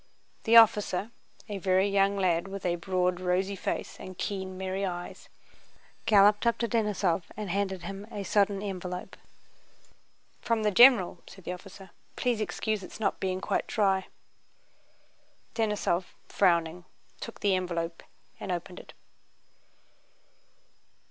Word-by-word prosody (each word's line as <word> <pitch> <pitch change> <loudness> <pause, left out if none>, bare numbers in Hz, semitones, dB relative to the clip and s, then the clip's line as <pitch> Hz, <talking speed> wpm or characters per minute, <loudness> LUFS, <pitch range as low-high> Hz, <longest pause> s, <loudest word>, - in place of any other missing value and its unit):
The 230 0 +4
officer, 210 -2 +4 0.4
a 205 -2 -4
very 190 +1 +2
young 200 0 +2
lad 180 -2 +1
with 195 -1 -7
a 175 -1 +1
broad 180 0 0
rosy 185 +2 0
face - - -4
and 185 -1 -9
keen 190 -2 -4
merry 190 +1 -3
eyes, 175 -2 -5 0.8
galloped 210 +1 +5
up 235 - +2
to 235 - -1
Denísov 205 -7 0
and 210 -4 -4
handed 190 -2 -2
him 200 +1 -7
a 200 - -4
sodden 200 0 +1
envelope. 185 -1 -5 1.3
"From 230 -2 0
the 210 - +2
general," 225 -6 +6
said 190 - -13
the 180 - -4
officer. 195 0 -12 0.2
"Please 240 -3 0
excuse 215 +2 -2
its 185 - -10
not 205 -3 0
being 185 -1 -2
quite - - -1
dry." 195 -3 +1 1.5
Denísov, 210 -5 0 0.2
frowning, 175 -2 +1 0.3
took 230 - -8
the 200 -1 +3
envelope 170 -2 -2 0.4
and 190 - -4
opened 180 +1 -4
it. - - -14
195 Hz, 130 wpm, -28 LUFS, 180-205 Hz, 1.5 s, general